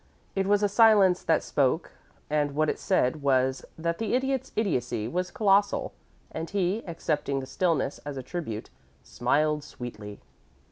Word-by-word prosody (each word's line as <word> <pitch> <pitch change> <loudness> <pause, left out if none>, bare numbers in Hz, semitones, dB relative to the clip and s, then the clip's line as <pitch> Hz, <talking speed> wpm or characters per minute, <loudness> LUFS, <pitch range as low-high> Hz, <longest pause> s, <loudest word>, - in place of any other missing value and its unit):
It 195 -1 0
was 205 0 +3
a - - +5
silence 200 -4 +5
that 160 - +2
spoke, 140 +4 0 0.4
and 145 -1 0
what 155 0 +2
it - - -8
said 155 -6 +1
was 130 -1 +1
that 170 +1 -2
the 225 +1 0
Idiot's 265 0 -1
idiocy 125 - -1
was 180 +8 -2
colossal, 200 0 +2 0.4
and 160 +1 -5
he, 200 +2 0
accepting 150 -4 -1
the 130 - -5
stillness 160 0 0
as 145 -1 -7
a 130 - -5
tribute, 125 -8 -5 0.3
smiled 150 +4 0
sweetly. 105 -7 -8
160 Hz, 150 wpm, -27 LUFS, 135-195 Hz, 0.4 s, a